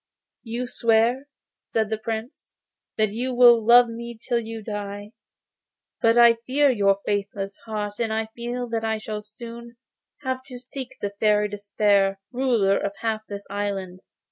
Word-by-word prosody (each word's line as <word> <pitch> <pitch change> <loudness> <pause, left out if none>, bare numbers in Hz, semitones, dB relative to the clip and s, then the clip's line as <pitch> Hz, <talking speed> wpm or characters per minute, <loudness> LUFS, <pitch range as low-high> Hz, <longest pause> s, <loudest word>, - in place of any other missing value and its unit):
'You 235 +1 -4
swear,' 235 +3 +2 0.4
said 220 -1 -1
the 220 - 0
Prince, 225 +3 -6 0.4
'that 215 -2 +2
you 245 +4 -2
will 240 -2 +7
love 240 +2 +7
me 235 0 -7
till 235 +1 0
you 225 -1 -7
die, 205 0 -6 0.9
but 230 0 +4
I 235 -1 +7
fear 280 +2 +4
your 200 -4 +3
faithless 200 -1 -3
heart, 210 -1 -4
and 230 -2 0
I 220 0 0
feel 245 +1 -4
that 225 -1 -2
I 220 0 0
shall 215 0 -5
soon 235 +2 -11 0.5
have 260 -1 -2
to 255 -2 -9
seek 260 +1 -8
the 200 - -2
Fairy 210 -1 +3
Despair, 200 -1 +1
ruler 240 -7 +2
of 200 - -2
half 220 -1 -1
this 200 0 -7
island. 195 -3 -3
225 Hz, 155 wpm, -24 LUFS, 205-240 Hz, 0.9 s, will